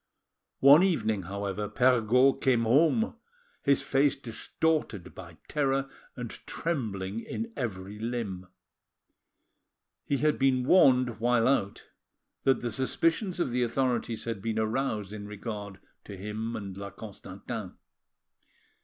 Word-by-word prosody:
One 140 Hz, +4 st, +9 dB
evening, 110 Hz, -, +1 dB
however, 100 Hz, +1 st, -3 dB
Perregaud 125 Hz, +1 st, +3 dB
came 125 Hz, -3 st, +3 dB
home, 160 Hz, -, +3 dB, 0.4 s
his 140 Hz, -1 st, +3 dB
face 135 Hz, +1 st, +2 dB
distorted 120 Hz, -, -2 dB
by 85 Hz, -3 st, -11 dB
terror 135 Hz, -2 st, 0 dB, 0.2 s
and 120 Hz, -3 st, -6 dB, 0.2 s
trembling 110 Hz, -, -3 dB
in 230 Hz, -, -5 dB
every 105 Hz, -5 st, -5 dB
limb. 110 Hz, -6 st, -4 dB, 1.6 s
He 140 Hz, -, 0 dB
had 150 Hz, +2 st, +1 dB
been 130 Hz, -2 st, +3 dB
warned 125 Hz, -, +5 dB
while 120 Hz, 0 st, +3 dB
out 105 Hz, -7 st, 0 dB, 0.6 s
that 135 Hz, -, +3 dB
the 120 Hz, -, -2 dB
suspicions 165 Hz, -, 0 dB
of 135 Hz, -, 0 dB
the 125 Hz, +1 st, 0 dB
authorities 120 Hz, -2 st, 0 dB
had 115 Hz, -4 st, -4 dB
been 110 Hz, +1 st, -2 dB
aroused 110 Hz, -2 st, -1 dB
in 105 Hz, -1 st, -7 dB
regard 105 Hz, -2 st, -6 dB, 0.3 s
to 100 Hz, -, -8 dB
him 110 Hz, +4 st, -4 dB
and 100 Hz, -3 st, -6 dB
La 100 Hz, 0 st, -6 dB
Constantin. 100 Hz, 0 st, -8 dB
115 Hz, 120 wpm, -29 LUFS, 105-135 Hz, 1.6 s, One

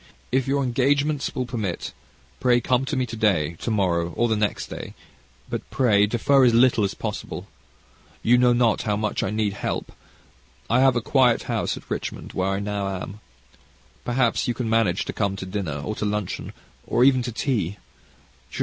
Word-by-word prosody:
If 130 Hz, +1 st, +1 dB
your 140 Hz, +1 st, +1 dB
engagements 140 Hz, +3 st, +1 dB
will 130 Hz, -, -1 dB
permit, 110 Hz, -8 st, -4 dB, 0.5 s
pray 125 Hz, -1 st, +4 dB
come 125 Hz, +2 st, +1 dB
to 140 Hz, -, -2 dB
me 130 Hz, -, +1 dB
to 120 Hz, -, -7 dB
day, 95 Hz, -8 st, +1 dB
to -, -, -3 dB
morrow, 85 Hz, -5 st, 0 dB
or 120 Hz, -, +2 dB
the 110 Hz, -, +1 dB
next 105 Hz, -1 st, -1 dB
day; -, -, -8 dB, 0.5 s
but, -, -, -3 dB
pray 105 Hz, -6 st, +3 dB
defer 135 Hz, +5 st, +3 dB
as 120 Hz, -2 st, +5 dB
little 120 Hz, -2 st, +4 dB
as 100 Hz, -, -1 dB
possible. -, -, -5 dB, 0.8 s
You 125 Hz, +2 st, +5 dB
know 125 Hz, 0 st, +5 dB
not 120 Hz, -2 st, +2 dB
how 105 Hz, -2 st, 0 dB
much 105 Hz, 0 st, -1 dB
I -, -, -1 dB
need 105 Hz, -1 st, 0 dB
help. 100 Hz, -, -4 dB, 0.8 s
I 120 Hz, -, +4 dB
have 130 Hz, -1 st, +5 dB
a 120 Hz, -, +1 dB
quiet 125 Hz, 0 st, +3 dB
house -, -, -2 dB
at -, -, -12 dB
Richmond, -, -, -5 dB
where 95 Hz, +1 st, 0 dB
I 95 Hz, 0 st, -1 dB
now 100 Hz, -1 st, -2 dB
am. 100 Hz, +3 st, -8 dB, 0.8 s
Perhaps 120 Hz, 0 st, +1 dB
you 120 Hz, -, 0 dB
can 120 Hz, -1 st, -3 dB
manage 110 Hz, -5 st, +2 dB
to -, -, -4 dB
come 100 Hz, -2 st, -1 dB
to 95 Hz, -, -6 dB
dinner, 90 Hz, -7 st, -3 dB
or 110 Hz, -, -2 dB
to -, -, -2 dB
luncheon, 105 Hz, -2 st, -3 dB, 0.3 s
or 120 Hz, -, +3 dB
even 130 Hz, -1 st, +5 dB
to 120 Hz, 0 st, -4 dB
tea. 110 Hz, -, -1 dB
115 Hz, 185 wpm, -24 LUFS, 100-125 Hz, 0.8 s, as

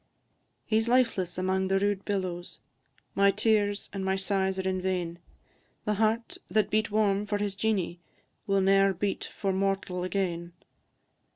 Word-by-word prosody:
"_ -, -, -42 dB, 0.6 s
He 220 Hz, -, +2 dB
's 225 Hz, -, -4 dB
lifeless 230 Hz, -8 st, +2 dB
amang 190 Hz, +1 st, 0 dB
the 195 Hz, 0 st, +2 dB
rude 200 Hz, 0 st, 0 dB
billows, 185 Hz, -4 st, -3 dB, 0.5 s
My 200 Hz, 0 st, +4 dB
tears 205 Hz, 0 st, +1 dB
and 195 Hz, -1 st, -3 dB
my 190 Hz, 0 st, +1 dB
sighs 190 Hz, 0 st, 0 dB
are 190 Hz, 0 st, -2 dB
in 185 Hz, -1 st, -1 dB
vain; 180 Hz, -2 st, -2 dB, 0.7 s
The 210 Hz, -, +1 dB
heart 225 Hz, +2 st, 0 dB
that 215 Hz, -2 st, +1 dB
beat 215 Hz, 0 st, +2 dB
warm 205 Hz, -1 st, +1 dB
for 205 Hz, 0 st, 0 dB
his 205 Hz, -1 st, -2 dB
Jeanie, 195 Hz, -5 st, -1 dB, 0.5 s
Will 195 Hz, -1 st, +3 dB
ne'er 195 Hz, 0 st, +4 dB
beat 195 Hz, +3 st, -2 dB
for 195 Hz, -2 st, 0 dB
mortal 190 Hz, -2 st, -1 dB
again. 175 Hz, -2 st, -2 dB
195 Hz, 160 wpm, -28 LUFS, 185-205 Hz, 0.7 s, My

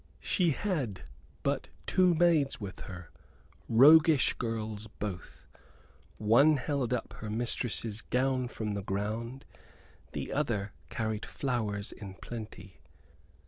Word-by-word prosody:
She 180 Hz, -3 st, +2 dB
had 140 Hz, -, -2 dB, 0.4 s
but -, -, -1 dB, 0.2 s
two 180 Hz, -2 st, +4 dB
maids 160 Hz, -6 st, +3 dB
with 100 Hz, -2 st, -7 dB
her, 90 Hz, -3 st, -9 dB, 0.6 s
roguish 150 Hz, +5 st, +7 dB
girls 110 Hz, -2 st, -4 dB
both. 100 Hz, -4 st, -6 dB, 0.7 s
One 140 Hz, +9 st, +5 dB
held 135 Hz, -2 st, -1 dB
up 125 Hz, -, -2 dB
her 110 Hz, -, -5 dB
mistress's 115 Hz, -1 st, -1 dB
gown 130 Hz, 0 st, 0 dB
from 110 Hz, -3 st, -4 dB
the 100 Hz, -, -2 dB
ground; 110 Hz, +6 st, -3 dB, 0.7 s
the -, -, -4 dB
other 115 Hz, -9 st, -1 dB, 0.2 s
carried 110 Hz, -3 st, -2 dB
flowers 110 Hz, -6 st, -2 dB
in 95 Hz, -2 st, -9 dB
plenty. 110 Hz, -4 st, -9 dB
115 Hz, 110 wpm, -31 LUFS, 105-135 Hz, 0.7 s, roguish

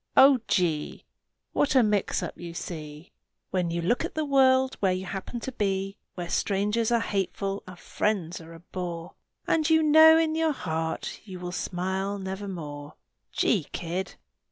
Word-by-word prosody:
Oh, 270 Hz, -1 st, +8 dB
gee! 165 Hz, -6 st, 0 dB, 0.5 s
What 285 Hz, -, +2 dB
a 255 Hz, -, +7 dB
mix 210 Hz, -2 st, +1 dB
up -, -, -5 dB
you 170 Hz, -1 st, -8 dB
see 155 Hz, -2 st, -7 dB, 0.4 s
When 180 Hz, -2 st, 0 dB
you 170 Hz, 0 st, -2 dB
look 240 Hz, +8 st, +1 dB
at -, -, -5 dB
the 310 Hz, -1 st, 0 dB
world 265 Hz, -2 st, +4 dB
where 190 Hz, -2 st, +2 dB
you 185 Hz, +1 st, -2 dB
happen 195 Hz, +6 st, -5 dB
to 265 Hz, -, -4 dB
be! 195 Hz, -3 st, -1 dB, 0.2 s
Where 175 Hz, -1 st, -4 dB
strangers 210 Hz, +5 st, 0 dB
are 235 Hz, -, +4 dB
hateful 195 Hz, -1 st, -2 dB
and 185 Hz, -1 st, -10 dB
friends 180 Hz, -4 st, -2 dB
are 165 Hz, +1 st, -11 dB
a 165 Hz, -, -13 dB
bore, 175 Hz, -2 st, -6 dB, 0.3 s
And 315 Hz, -1 st, +2 dB
you 320 Hz, 0 st, +5 dB
know 315 Hz, +1 st, +8 dB
in 325 Hz, -1 st, +2 dB
your 320 Hz, -1 st, +1 dB
heart 160 Hz, -, -3 dB
you 190 Hz, -3 st, -9 dB
will 180 Hz, 0 st, -5 dB
smile 190 Hz, +2 st, -2 dB
nevermore! 185 Hz, -7 st, -6 dB, 0.4 s
Gee, 190 Hz, -10 st, +1 dB
kid! 175 Hz, +2 st, -3 dB
190 Hz, 165 wpm, -27 LUFS, 175-240 Hz, 0.5 s, Oh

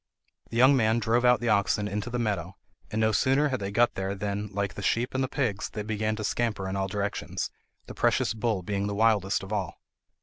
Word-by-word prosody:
The 115 Hz, -, -4 dB
young 130 Hz, +3 st, +7 dB
man 110 Hz, -2 st, +3 dB
drove 115 Hz, +2 st, +1 dB
out 125 Hz, -1 st, +4 dB
the 120 Hz, -, 0 dB
oxen 105 Hz, 0 st, +2 dB
into 105 Hz, +3 st, -3 dB
the 120 Hz, -, -2 dB
meadow, 100 Hz, -6 st, -2 dB, 0.3 s
and 110 Hz, -, -2 dB
no 110 Hz, 0 st, +3 dB
sooner 135 Hz, +7 st, +3 dB
had 130 Hz, -2 st, -1 dB
they 100 Hz, -, -3 dB
got 120 Hz, +4 st, +3 dB
there 95 Hz, +1 st, -3 dB
than, 100 Hz, +1 st, -3 dB
like 100 Hz, 0 st, -2 dB
the -, -, -7 dB
sheep 115 Hz, +4 st, 0 dB
and 130 Hz, 0 st, 0 dB
the -, -, 0 dB
pigs, 120 Hz, -7 st, -2 dB
they 105 Hz, -, -5 dB
began 110 Hz, 0 st, -1 dB
to 110 Hz, -, -5 dB
scamper 105 Hz, -3 st, -1 dB
in 95 Hz, -, -3 dB
all 95 Hz, 0 st, -1 dB
directions, 100 Hz, +1 st, -3 dB, 0.3 s
the -, -, -9 dB
precious -, -, +1 dB
bull 110 Hz, -4 st, -1 dB
being 100 Hz, +2 st, -2 dB
the 100 Hz, -, -3 dB
wildest 105 Hz, -3 st, +2 dB
of 95 Hz, +2 st, -6 dB
all. 95 Hz, -4 st, -3 dB
105 Hz, 230 wpm, -27 LUFS, 100-120 Hz, 0.3 s, young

